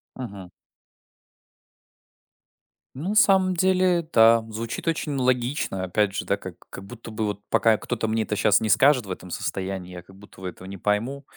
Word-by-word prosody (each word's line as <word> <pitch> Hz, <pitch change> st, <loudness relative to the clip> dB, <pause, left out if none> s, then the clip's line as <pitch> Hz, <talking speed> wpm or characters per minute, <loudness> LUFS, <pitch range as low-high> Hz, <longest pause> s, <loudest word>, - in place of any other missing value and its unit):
Мгм. 100 Hz, -8 st, -8 dB, 2.5 s
Ну, 160 Hz, +9 st, -4 dB
на 210 Hz, -, -1 dB
самом 190 Hz, -3 st, +4 dB
деле, 185 Hz, -2 st, +2 dB
да, 115 Hz, 0 st, +6 dB
звучит 115 Hz, +7 st, -5 dB
очень 155 Hz, -2 st, -1 dB
логично. 125 Hz, -6 st, 0 dB
Опять 100 Hz, +2 st, 0 dB
же, -, -, -3 dB
да, 100 Hz, -, 0 dB
как 95 Hz, -3 st, -9 dB
как 95 Hz, -, -9 dB
будто 115 Hz, +2 st, -10 dB
бы, 110 Hz, 0 st, -2 dB
вот, 105 Hz, -1 st, -4 dB
пока 110 Hz, -1 st, +3 dB
кто-то 110 Hz, -1 st, -3 dB
мне 110 Hz, 0 st, 0 dB
это 105 Hz, -, -3 dB
щас 105 Hz, 0 st, +3 dB
не 110 Hz, -, -1 dB
скажет 130 Hz, 0 st, +4 dB
в 95 Hz, -, -7 dB
этом 90 Hz, 0 st, -7 dB
состоянии, 95 Hz, +1 st, -4 dB
я 90 Hz, -, -8 dB
как 95 Hz, +2 st, -18 dB
будто 100 Hz, -1 st, -16 dB
бы 95 Hz, -, -4 dB
этого 95 Hz, -, -12 dB
не 100 Hz, 0 st, -8 dB
пойму. 115 Hz, +9 st, -1 dB
110 Hz, 180 wpm, -24 LUFS, 95-135 Hz, 2.5 s, да